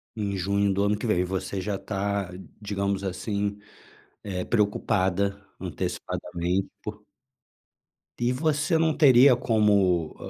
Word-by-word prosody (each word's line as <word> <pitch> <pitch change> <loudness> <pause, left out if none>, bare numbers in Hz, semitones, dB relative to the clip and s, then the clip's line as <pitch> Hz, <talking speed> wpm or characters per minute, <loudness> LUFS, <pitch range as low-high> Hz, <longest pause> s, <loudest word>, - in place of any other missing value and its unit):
Em 100 -2 -2
junho 100 +1 +1
do 100 +1 +1
ano 105 0 +1
que 115 - -4
vem 90 -5 +2
e - - +2
você 95 +1 -3
já 100 0 -2
tá, 100 -2 -2 0.3
digamos 100 -1 -2
assim, 100 +2 -2 0.7
eh, 90 -3 -4
preocupada 100 -2 0
antecipadamente 90 +3 -3
por 105 0 -8 1.2
E 120 +1 +1
você 155 +4 +1
não 160 -1 +2
teria 130 -2 +7
como 100 -8 +2
100 Hz, 120 wpm, -26 LUFS, 95-110 Hz, 1.2 s, teria